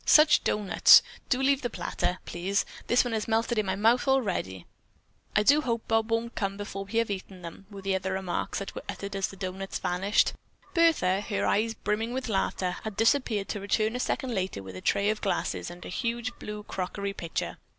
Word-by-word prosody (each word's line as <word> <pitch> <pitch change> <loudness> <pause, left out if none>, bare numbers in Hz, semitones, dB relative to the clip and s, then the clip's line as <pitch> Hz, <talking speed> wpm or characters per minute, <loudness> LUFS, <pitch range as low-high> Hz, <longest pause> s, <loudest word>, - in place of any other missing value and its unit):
"Such 305 0 +6
doughnuts! 210 -2 +6 0.3
Do 255 - +2
leave 275 0 +3
the 245 - -2
platter, 180 - -2
please; 190 +4 -1 0.2
this 240 - +4
one 245 - -2
has 220 -1 -1
melted 225 +1 +1
in 210 - -1
my 190 - 0
mouth 230 +6 +3
already!" 190 - 0 0.7
"I 210 - +4
do 290 +7 +5
hope 235 -4 -2
Bob 225 0 +1
won't 230 +1 -1
come 195 -1 -2
before 195 -1 -5
we 215 +4 -4
have 230 -1 +2
them 200 - +1
eaten!" 185 -1 -14 0.3
were 200 -2 -10
among 190 -1 +1
the 190 - -2
remarks 190 -2 -2
that 200 - -5
were - - -6
uttered 200 0 -5
as 195 -1 0
the - - -11
doughnuts 190 +1 -4
vanished. 190 +4 +1 0.4
Bertha, 315 - +3
her 205 -1 -2
eyes 225 +2 +1
brimming 220 +3 -2
with 260 -2 -3
laughter, 190 -2 -1
had 215 -2 -5
disappeared 225 -4 +2
to 205 - -2
return 215 +3 0
a - - -2
second 250 0 -1
later 185 - -2
with 95 -1 -9
a 95 - -7
tray 200 +1 +2
of 215 - -4
glasses 195 - -1
and 175 +1 -10
a - - -6
huge 235 +4 -2
blue 210 0 -6
crockery 200 +1 -4
pitcher. 170 -4 -4
210 Hz, 205 wpm, -28 LUFS, 190-230 Hz, 0.7 s, Such